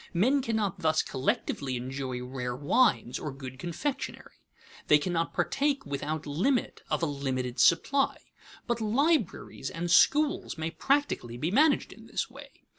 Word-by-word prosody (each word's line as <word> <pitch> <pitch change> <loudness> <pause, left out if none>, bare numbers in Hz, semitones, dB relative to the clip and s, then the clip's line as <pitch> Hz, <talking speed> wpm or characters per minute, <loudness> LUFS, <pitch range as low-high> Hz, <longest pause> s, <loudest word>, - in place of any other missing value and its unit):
Men 255 +11 +3
cannot 215 -5 -1
thus 160 -2 +2
collectively 130 0 -1
enjoy 130 0 -4
rare 125 -1 -4
wines 145 - +2
or 150 - -4
good 130 -1 -9
confectionery; 215 - -4 0.5
they 150 - +7
cannot 165 +2 -1
partake 280 0 0
without 145 +2 -3
limit 205 - 0
of - - 0
a - - +4
limited 130 -4 -3
supply. 275 +11 +3 0.5
But 240 -1 -1
libraries 265 - 0
and 175 -1 -3
schools 295 - +3
may 160 +1 -3
practically 270 - 0
be 155 +8 -1
managed 290 +7 +3
in - - -15
this - - -3
way. - - -14
165 Hz, 140 wpm, -29 LUFS, -, 0.5 s, they